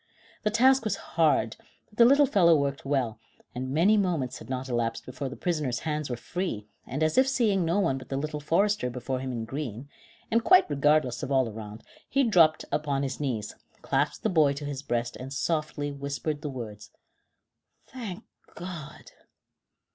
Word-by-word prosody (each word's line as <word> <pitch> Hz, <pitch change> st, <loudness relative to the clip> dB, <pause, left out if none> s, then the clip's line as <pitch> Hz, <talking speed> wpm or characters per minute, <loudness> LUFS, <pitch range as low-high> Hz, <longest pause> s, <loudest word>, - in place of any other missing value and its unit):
The 210 Hz, -, +1 dB
task 260 Hz, +4 st, +4 dB
was 215 Hz, -, 0 dB, 0.2 s
hard, 150 Hz, -9 st, +2 dB, 0.3 s
but 210 Hz, -, -21 dB
the 235 Hz, -, +9 dB
little 280 Hz, +4 st, +6 dB
fellow 175 Hz, -9 st, +5 dB
worked 140 Hz, -2 st, -1 dB
well, 130 Hz, -5 st, -1 dB, 0.3 s
and 130 Hz, +1 st, -4 dB
many 175 Hz, +10 st, +4 dB
moments 170 Hz, -10 st, -1 dB
had -, -, -12 dB
not 130 Hz, 0 st, -3 dB
elapsed 120 Hz, -2 st, -2 dB
before 130 Hz, +2 st, -5 dB
the 135 Hz, -, -8 dB
prisoner's 150 Hz, -8 st, -1 dB
hands 150 Hz, -2 st, -2 dB
were 120 Hz, -, -1 dB
free, 120 Hz, -, -4 dB, 0.2 s
and 145 Hz, +5 st, -2 dB
as 155 Hz, +8 st, +3 dB
if 260 Hz, -, +4 dB
seeing 220 Hz, -8 st, +2 dB
no 170 Hz, +5 st, +1 dB
one 150 Hz, -9 st, +1 dB
but 130 Hz, -, -13 dB
the 135 Hz, -, -2 dB
little 150 Hz, +1 st, -3 dB
forester 170 Hz, 0 st, +1 dB
before 125 Hz, +1 st, -3 dB
him 130 Hz, 0 st, -4 dB
in 115 Hz, -2 st, -3 dB
green, 135 Hz, 0 st, -5 dB, 0.4 s
and 230 Hz, +1 st, +3 dB
quite 370 Hz, +5 st, +6 dB
regardless 150 Hz, +2 st, +2 dB
of 140 Hz, -2 st, -4 dB
all 130 Hz, -2 st, +3 dB
around, 110 Hz, 0 st, -8 dB, 0.3 s
he 275 Hz, +1 st, +3 dB
dropped 170 Hz, -9 st, +4 dB
upon 145 Hz, -2 st, 0 dB
his 135 Hz, -1 st, -3 dB
knees, 120 Hz, -7 st, -2 dB, 0.3 s
clasped -, -, 0 dB
the 220 Hz, -, +2 dB
boy 155 Hz, -6 st, +4 dB
to 145 Hz, +1 st, -6 dB
his 140 Hz, -2 st, -4 dB
breast, 120 Hz, -3 st, -2 dB
and 130 Hz, +2 st, -7 dB
softly 150 Hz, -1 st, -1 dB
whispered 140 Hz, +1 st, -4 dB
the 150 Hz, -, -4 dB
words: 110 Hz, -5 st, -7 dB, 1.0 s
"Thank 225 Hz, -5 st, -7 dB, 0.3 s
God!" 170 Hz, -4 st, -8 dB
145 Hz, 180 wpm, -27 LUFS, 130-175 Hz, 1.0 s, the